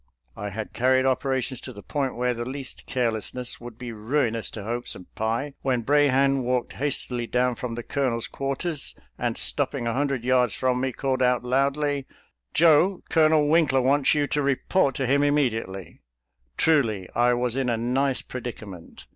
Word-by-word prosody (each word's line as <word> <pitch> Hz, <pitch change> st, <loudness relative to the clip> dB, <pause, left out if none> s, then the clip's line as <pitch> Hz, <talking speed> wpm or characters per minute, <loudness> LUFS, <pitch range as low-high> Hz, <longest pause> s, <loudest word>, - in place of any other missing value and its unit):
I 105 Hz, -, -5 dB
had 110 Hz, +2 st, -6 dB
carried 130 Hz, +1 st, +3 dB
operations 130 Hz, -1 st, 0 dB
to 130 Hz, -, -7 dB
the 100 Hz, -4 st, -11 dB
point 135 Hz, -3 st, -2 dB
where 125 Hz, 0 st, 0 dB
the 120 Hz, 0 st, -4 dB
least 130 Hz, +2 st, -7 dB
careless 115 Hz, -4 st, -1 dB
ness 125 Hz, -1 st, -4 dB
would 120 Hz, -2 st, -9 dB
be 125 Hz, -1 st, -6 dB
ruinous 115 Hz, +1 st, -1 dB
to 105 Hz, -, -7 dB
hopes 120 Hz, +3 st, -3 dB
and 90 Hz, -, -11 dB
pie, 115 Hz, +6 st, -2 dB
when 125 Hz, -3 st, 0 dB
Brahan 135 Hz, 0 st, +3 dB
walked 125 Hz, 0 st, -1 dB
hastily 125 Hz, -3 st, -3 dB
down 125 Hz, +1 st, +1 dB
from 120 Hz, -1 st, -5 dB
the 120 Hz, -, -5 dB
Colonel's 125 Hz, -4 st, -1 dB
quarters, 140 Hz, +3 st, -3 dB, 0.2 s
and -, -, -1 dB
stopping 120 Hz, -, +1 dB
a 115 Hz, -, 0 dB
hundred 135 Hz, -2 st, -1 dB
yards 125 Hz, -3 st, +2 dB
from 125 Hz, -1 st, 0 dB
me, 130 Hz, 0 st, 0 dB
called 130 Hz, 0 st, -1 dB
out 125 Hz, -1 st, +2 dB
loudly, 140 Hz, +2 st, 0 dB, 0.2 s
" -, -, -50 dB
Joe, 170 Hz, +4 st, +4 dB
Colonel 155 Hz, -2 st, +4 dB
Winkler 150 Hz, -5 st, +3 dB
wants 140 Hz, +3 st, +3 dB
you 145 Hz, -1 st, +2 dB
to 145 Hz, +1 st, -1 dB
report 140 Hz, +1 st, +1 dB
to 135 Hz, -, -1 dB
him 140 Hz, +3 st, +3 dB
immediately." 115 Hz, -10 st, -1 dB, 0.6 s
Truly, 115 Hz, -, +2 dB
I 120 Hz, +1 st, +3 dB
was 120 Hz, 0 st, -1 dB
in 135 Hz, -2 st, 0 dB
a 115 Hz, -, +1 dB
nice 130 Hz, +3 st, 0 dB
predicament. 110 Hz, -8 st, -8 dB
130 Hz, 175 wpm, -25 LUFS, 120-140 Hz, 0.6 s, Joe